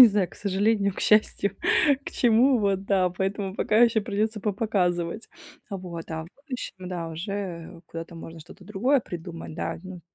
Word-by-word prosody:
я 250 Hz, -, +14 dB
не -, -, +8 dB
знаю, 200 Hz, -4 st, +1 dB
к -, -, -16 dB
сожалению, 200 Hz, 0 st, +1 dB
к -, -, -6 dB
счастью, 210 Hz, -1 st, +3 dB, 0.6 s
к -, -, -3 dB
чему 245 Hz, +2 st, +4 dB
вот, 195 Hz, -2 st, +1 dB
да. 190 Hz, -2 st, +3 dB
Поэтому 190 Hz, +1 st, -2 dB
пока 215 Hz, -, +1 dB
еще 230 Hz, -1 st, +2 dB
придется 215 Hz, 0 st, -1 dB
попоказывать. 195 Hz, -2 st, 0 dB, 0.4 s
Вот. 175 Hz, -4 st, -6 dB
А 160 Hz, 0 st, -3 dB
в -, -, -12 dB
будущем, 250 Hz, -, -7 dB
да, 170 Hz, -2 st, -4 dB
уже 175 Hz, -1 st, -5 dB
куда-то 165 Hz, +1 st, -7 dB
можно 165 Hz, 0 st, -9 dB
что-то 160 Hz, -, -14 dB
другое 245 Hz, +7 st, +2 dB
придумать, 165 Hz, -5 st, -7 dB
да. -, -, -3 dB
Ну, 185 Hz, -2 st, -8 dB
195 Hz, 170 wpm, -26 LUFS, 175-215 Hz, 0.6 s, я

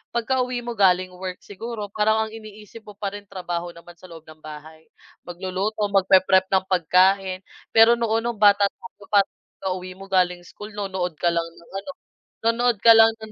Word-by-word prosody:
pagkauwi 250 Hz, +1 st, -1 dB
mo 240 Hz, -, -4 dB
galing 185 Hz, -2 st, +2 dB
work, 185 Hz, 0 st, -6 dB
siguro 210 Hz, +1 st, -7 dB
parang 220 Hz, +1 st, +1 dB
ang -, -, -12 dB
iniisip 215 Hz, 0 st, -12 dB
mo 210 Hz, -1 st, -14 dB
pa 200 Hz, -1 st, -4 dB
rin 205 Hz, -, -9 dB
trabaho 175 Hz, -2 st, -5 dB
naman 170 Hz, +1 st, -15 dB
sa 180 Hz, +1 st, -16 dB
loob 160 Hz, -1 st, -12 dB
ng 155 Hz, 0 st, -15 dB
bahay, 155 Hz, +1 st, -11 dB, 0.4 s
magluluto 190 Hz, +4 st, -3 dB
mag-pre-prep 190 Hz, -1 st, +4 dB
ng 190 Hz, -1 st, +2 dB
pagkain. 185 Hz, +1 st, +2 dB, 0.3 s
Pero 225 Hz, +1 st, +6 dB
noon 225 Hz, -1 st, 0 dB
nung 235 Hz, -3 st, -3 dB
bata 205 Hz, -1 st, +6 dB
tayo 210 Hz, -1 st, -15 dB
pagka-uwi 185 Hz, -2 st, -2 dB
mo 195 Hz, +1 st, -13 dB
galing 180 Hz, -1 st, +1 dB
school, 210 Hz, +4 st, -11 dB
nonood 190 Hz, -4 st, -3 dB
ka 175 Hz, -, +1 dB
lang 170 Hz, 0 st, -1 dB
ng 170 Hz, 0 st, -18 dB
ano, 200 Hz, -, -8 dB, 0.5 s
nonood 235 Hz, +1 st, +2 dB
ka 230 Hz, -, +8 dB
lang 225 Hz, 0 st, +8 dB, 0.2 s
ng 215 Hz, -, -9 dB
195 Hz, 175 wpm, -23 LUFS, 180-220 Hz, 0.5 s, ka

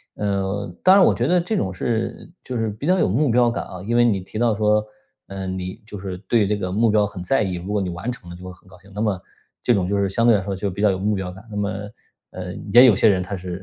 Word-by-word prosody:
呃， 100 Hz, 0 st, -2 dB, 0.2 s
当 185 Hz, +1 st, +6 dB
然 195 Hz, -, +7 dB
我 -, -, +5 dB
觉 120 Hz, -, -1 dB
得 180 Hz, +2 st, +3 dB
这 210 Hz, +5 st, -2 dB
种 95 Hz, -, -1 dB
是 115 Hz, -, -3 dB
就 130 Hz, -, -6 dB
是 115 Hz, -2 st, 0 dB
比 110 Hz, +9 st, -6 dB
较 185 Hz, -, +4 dB
有 -, -, +3 dB
目 135 Hz, +7 st, +2 dB
标 120 Hz, +1 st, +4 dB
感 -, -, -4 dB
啊。 90 Hz, -1 st, -9 dB
因 120 Hz, +4 st, 0 dB
为 120 Hz, -, +5 dB
你 100 Hz, -5 st, +1 dB
提 95 Hz, +3 st, -9 dB
到 120 Hz, -3 st, +2 dB
说， 105 Hz, 0 st, +2 dB, 0.5 s
呃， 95 Hz, -1 st, -6 dB
你 95 Hz, 0 st, -5 dB
就 105 Hz, -2 st, -8 dB
是 95 Hz, -1 st, -5 dB
对 105 Hz, +2 st, +1 dB
这 105 Hz, -, +1 dB
个 95 Hz, -3 st, -4 dB
目 110 Hz, +4 st, +2 dB
标 105 Hz, -1 st, +3 dB
很 100 Hz, -3 st, -7 dB
在 110 Hz, +6 st, +1 dB
意， 95 Hz, -2 st, -2 dB
如 90 Hz, +4 st, -5 dB
果 105 Hz, -, +1 dB
你 90 Hz, -, -2 dB
完 85 Hz, +7 st, -5 dB
成 90 Hz, -8 st, -11 dB
了 85 Hz, -, -8 dB
就 90 Hz, +1 st, -11 dB
会 90 Hz, -, -7 dB
很 90 Hz, -, -22 dB
高 90 Hz, -1 st, -16 dB
兴， 95 Hz, -, -19 dB
那 105 Hz, -, -3 dB
么 105 Hz, -5 st, 0 dB, 0.4 s
这 120 Hz, -, +3 dB
种 95 Hz, -3 st, 0 dB
就 100 Hz, -, +1 dB
是 100 Hz, 0 st, +1 dB
相 115 Hz, +4 st, 0 dB
对 120 Hz, -, +6 dB
来 -, -, -2 dB
说 100 Hz, 0 st, -4 dB
就 95 Hz, +1 st, -3 dB
比 100 Hz, +3 st, -5 dB
较 105 Hz, -, +4 dB
有 95 Hz, -, 0 dB
目 105 Hz, +2 st, 0 dB
标 95 Hz, -2 st, -4 dB
感。 95 Hz, +2 st, -13 dB
那 105 Hz, -, -5 dB
么， 100 Hz, 0 st, 0 dB, 0.6 s
呃， 90 Hz, -1 st, -6 dB, 0.2 s
也 125 Hz, +2 st, +9 dB
有 115 Hz, -6 st, +6 dB
些 110 Hz, -, +4 dB
人 95 Hz, -2 st, +2 dB
他 95 Hz, +2 st, -4 dB
是 90 Hz, 0 st, -6 dB
100 Hz, 320 characters per minute, -22 LUFS, 95-115 Hz, 0.6 s, 也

